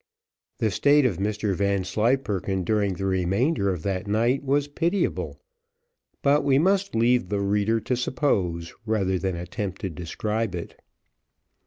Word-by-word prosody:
The 110 - 0
state 145 +6 +4
of 110 -9 +1
Mr 105 +1 -1
Vanslyperken 100 +1 0
during 100 0 +1
the 95 - -4
remainder 95 - +1
of 90 -4 -4
that 100 +1 -2
night 115 +6 +1
was 140 +1 +1
pitiable, 170 +6 -1 0.8
but 145 +1 +4
we 135 -1 +3
must 195 +3 +2
leave 120 +2 +2
the 100 -1 0
reader 105 +3 +1
to 125 +4 -1
suppose, 100 - -1
rather 95 -4 +1
than 95 -1 -2
attempt 90 +2 -5
to 95 - -3
describe 105 +5 -3
it. 85 - -8
105 Hz, 140 wpm, -25 LUFS, 95-125 Hz, 0.8 s, state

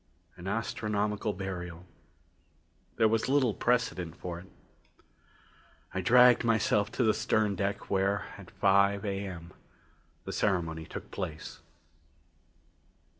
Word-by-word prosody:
An 85 - -9
astronomical 105 -1 -1
burial 90 -3 -6 1.1
there 110 - +4
was 115 +3 0
little 135 -5 +3
precedent 95 -10 0
for 85 -1 -6
it. 90 - -13 1.5
I 95 - -1
dragged 125 +5 +6
myself 110 -3 +2
to 125 - +1
the 110 -2 +4
stern 110 -1 +1
deck 100 +2 -2
where, 100 +1 0
at - - -12
five 100 +1 +3
A.M., 95 -4 -5 0.7
the - - -6
ceremony 85 -5 0
took - - -8
place. 80 -4 -6
100 Hz, 110 wpm, -30 LUFS, 90-110 Hz, 1.5 s, dragged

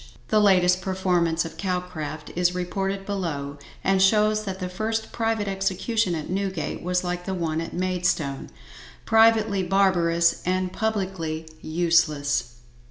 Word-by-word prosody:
The 215 - +4
latest 180 -2 +4
performance 180 -3 0
of 165 - -8
Calcraft 180 -5 -4
is 180 +1 +2
reported 195 +2 -2
below, 145 -8 -4 0.2
and 195 0 +2
shows 215 +2 +3
that 190 -1 -4
the 185 -1 -4
first 220 +4 -3
private 225 -2 -1
execution 195 +1 0
at 155 - -5
Newgate 190 -4 -3
was 180 +1 0
like 180 0 -3
the 190 - -2
one 165 -2 -1
at 165 - -6
Maidstone, 180 -6 -1 0.6
privately 220 -2 +4
barbarous 175 -3 +2
and 185 0 -1
publicly 185 -7 -2
useless. 150 -7 +1
180 Hz, 130 wpm, -24 LUFS, 170-195 Hz, 0.6 s, The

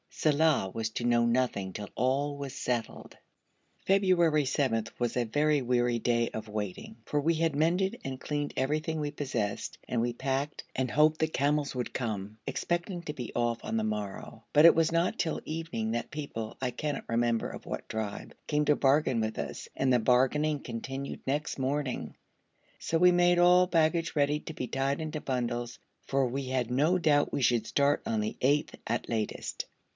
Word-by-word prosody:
Saleh 150 -10 +2
was 110 -1 -2
to 120 - -4
know 120 -1 +3
nothing 120 -6 0
till 105 -1 -6
all 140 +4 0
was 140 -2 -5
settled. 120 -4 -3 0.7
February 175 -6 +3
7 130 -5 +1
was 120 -2 0
a 125 -1 +1
very 145 +5 +2
weary 120 -1 +1
day 120 0 +1
of 110 0 -6
waiting; 105 - -5
for 145 - 0
we 165 +3 +2
had 160 -2 +1
mended 175 +6 +1
and 130 -1 -5
cleaned 145 0 -3
everything 155 +4 0
we 150 -1 -1
possessed, 130 -8 -3
and 120 - 0
we 120 0 0
packed 135 +3 -2
and 130 -1 0
hoped 155 +2 +4
the 160 - +2
camels 145 -1 0
would 125 -2 -4
come, 110 -4 -3
expecting 175 +1 -2
to 150 - -4
be 125 -6 -6
off 120 -1 0
on 115 - -2
the 110 - 0
morrow, 105 +1 -4
but 150 +2 +7
it 170 - +9
was 165 0 +3
not 170 +2 +1
till 160 - -1
evening 155 -9 -3
that 120 +1 -3
people, 115 -7 -5
I 130 -1 0
cannot 145 +3 -4
remember 115 0 +1
of - - -9
what - - -5
tribe, 110 -2 -4
came 150 0 +1
to 150 - +4
bargain 135 -4 +3
with 110 0 -2
us, - - -5
and 130 -1 +2
the 125 - +4
bargaining 135 +6 +2
continued 135 +3 -6
next 145 +3 -1
morning; 135 - -2 0.6
so 165 - 0
we 180 +2 +6
made 175 0 +4
all 180 +1 +6
baggage 165 -1 +1
ready 145 0 +2
to 160 - -7
be 125 - -4
tied 135 +3 -1
into 155 -1 -4
bundles, 120 -2 -2 0.3
for 135 -1 +1
we 135 +2 -3
had 130 -2 -1
no 150 +9 +3
doubt 150 -4 +3
we - - 0
should 120 -3 +3
start 140 +3 +2
on 110 - 0
the 105 0 -2
8th 145 +3 +2
at 120 +2 -2
latest. 110 -2 -3
135 Hz, 185 wpm, -29 LUFS, 120-155 Hz, 0.7 s, it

